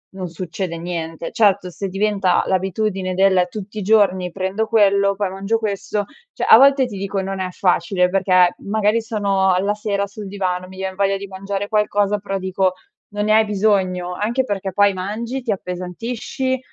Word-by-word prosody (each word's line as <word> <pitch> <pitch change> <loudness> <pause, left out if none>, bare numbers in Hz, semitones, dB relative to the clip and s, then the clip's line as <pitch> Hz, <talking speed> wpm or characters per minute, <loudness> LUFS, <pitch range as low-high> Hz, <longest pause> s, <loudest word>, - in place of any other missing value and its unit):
non 185 -1 -4
succede 175 +1 -5
niente. 165 -1 -5
Certo, 200 -5 +2
se 195 +3 -5
diventa 195 -1 +1
l'abitudine 190 0 -1
del: 190 -1 +3
“Tutti 210 +2 -8
i - - -2
giorni 190 -3 +3
prendo 190 +4 -2
quello, 200 -2 +3
poi, 200 -1 -1
mangio 195 +4 -1
questo.“ 205 -1 -2 0.3
Cioè, - - -3
a - - +10
volte 275 0 +5
ti 210 -5 -7
dico 195 0 -2
non 195 0 -4
è 185 -1 -3
facile 180 0 +1
perché, 185 -1 +3
magari, 215 +2 +1
sono 200 -4 +1
alla 200 +3 0
sera 200 -1 -2
sul 205 +1 -9
divano, 185 -2 -3
mi 185 0 -13
vien 190 0 -4
voglia 195 0 +1
di 200 0 -6
mangiare 195 +1 -4
qualcosa, 210 -1 +1
però 195 -1 -4
dico: 190 0 0 0.4
“Non 205 0 -2
ne 215 - +3
hai 220 0 +5
bisogno.“ 190 -4 0
Anche 235 +7 0
perché, 195 -5 -3
poi, 205 +1 +4
mangi, 230 +7 -4
ti 235 - -1
appesantisci, 215 +8 -3
195 Hz, 175 wpm, -20 LUFS, 185-210 Hz, 0.4 s, a